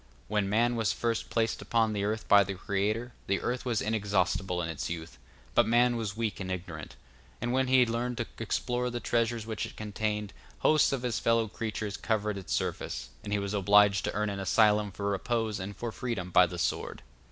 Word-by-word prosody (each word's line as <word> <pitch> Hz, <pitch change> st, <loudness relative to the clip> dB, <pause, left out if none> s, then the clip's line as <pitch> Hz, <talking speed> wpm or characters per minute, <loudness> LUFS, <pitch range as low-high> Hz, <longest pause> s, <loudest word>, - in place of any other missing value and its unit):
When 105 Hz, -2 st, 0 dB
man 120 Hz, +3 st, +2 dB
was 110 Hz, -5 st, +1 dB
first 115 Hz, -1 st, -1 dB
placed 115 Hz, -1 st, 0 dB
upon 115 Hz, -2 st, +1 dB
the 100 Hz, -1 st, -1 dB
earth 110 Hz, +1 st, -2 dB
by 100 Hz, -1 st, +7 dB
the 100 Hz, 0 st, -4 dB
Creator, 105 Hz, +6 st, -1 dB
the 100 Hz, 0 st, +1 dB
earth 125 Hz, +1 st, -2 dB
was 120 Hz, -4 st, 0 dB
inexhaustible 95 Hz, -4 st, 0 dB
in 85 Hz, -, -1 dB
its 80 Hz, -3 st, -4 dB
youth, 85 Hz, -1 st, -6 dB, 0.3 s
but -, -, +4 dB
man 120 Hz, +1 st, +4 dB
was 110 Hz, -3 st, -3 dB
weak 115 Hz, -2 st, -2 dB
and 95 Hz, -1 st, -4 dB
ignorant; 85 Hz, -4 st, -6 dB, 0.4 s
and 120 Hz, +1 st, -1 dB
when 130 Hz, 0 st, +2 dB
he 130 Hz, 0 st, +5 dB
had 120 Hz, -, +3 dB
learned 120 Hz, +1 st, -2 dB
to 120 Hz, -, -1 dB
explore 125 Hz, +2 st, -1 dB
the 120 Hz, 0 st, -3 dB
treasures 115 Hz, -1 st, 0 dB
which 110 Hz, -2 st, -3 dB
it -, -, -13 dB
contained, 105 Hz, -1 st, -3 dB, 0.3 s
hosts 155 Hz, -1 st, +4 dB
of 135 Hz, -2 st, -2 dB
his 120 Hz, -3 st, -1 dB
fellow 115 Hz, -1 st, +2 dB
creatures 110 Hz, -1 st, -4 dB
covered 105 Hz, -2 st, -1 dB
its 90 Hz, -6 st, -9 dB
surface, 65 Hz, -, -2 dB
and 105 Hz, -, -6 dB
he 105 Hz, -, +2 dB
was 100 Hz, 0 st, -3 dB
obliged 100 Hz, 0 st, +5 dB
to -, -, -2 dB
earn 105 Hz, 0 st, 0 dB
an 100 Hz, -, -4 dB
asylum 105 Hz, +1 st, +3 dB
for 100 Hz, +2 st, -4 dB
repose 110 Hz, +2 st, -1 dB
and 100 Hz, +2 st, -6 dB
for 120 Hz, -1 st, -3 dB
freedom 105 Hz, -7 st, -4 dB
by 90 Hz, 0 st, +6 dB
the 90 Hz, -, -7 dB
sword. 85 Hz, -, -2 dB
105 Hz, 210 wpm, -29 LUFS, 100-115 Hz, 0.4 s, by